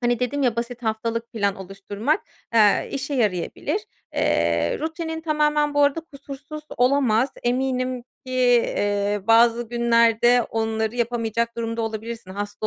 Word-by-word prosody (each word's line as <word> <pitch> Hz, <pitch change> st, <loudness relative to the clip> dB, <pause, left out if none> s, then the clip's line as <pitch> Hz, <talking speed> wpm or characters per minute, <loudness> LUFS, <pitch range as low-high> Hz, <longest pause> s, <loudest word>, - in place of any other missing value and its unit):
hani, 240 Hz, 0 st, +1 dB
dedim 265 Hz, +3 st, -1 dB
ya, 240 Hz, -3 st, +1 dB
basit 240 Hz, +1 st, -4 dB
haftalık 230 Hz, +1 st, -2 dB
plan 200 Hz, -3 st, 0 dB
oluşturmak, 200 Hz, -, -2 dB, 0.3 s
ııı, 210 Hz, -3 st, +4 dB
işe 275 Hz, +1 st, -3 dB
yarayabilir. 225 Hz, -, -1 dB, 0.3 s
Eee, 85 Hz, 0 st, +1 dB
rutinin 320 Hz, 0 st, -4 dB
tamamen 300 Hz, -2 st, +1 dB
bu 290 Hz, -, +4 dB
arada 285 Hz, +3 st, +2 dB
kusursuz 285 Hz, 0 st, -10 dB
olamaz. 250 Hz, -2 st, +3 dB
Eminim 255 Hz, 0 st, -1 dB, 0.2 s
ki, 255 Hz, -, -6 dB, 0.5 s
iii, 205 Hz, 0 st, 0 dB
bazı 230 Hz, +1 st, +4 dB
günlerde 235 Hz, 0 st, +4 dB
onları 220 Hz, 0 st, -2 dB
yapamayacak 235 Hz, -1 st, -1 dB
durumda 230 Hz, 0 st, -2 dB
olabilirsin. 225 Hz, -2 st, -5 dB
Hasta 205 Hz, +2 st, -4 dB
235 Hz, 130 wpm, -23 LUFS, 220-270 Hz, 0.5 s, ııı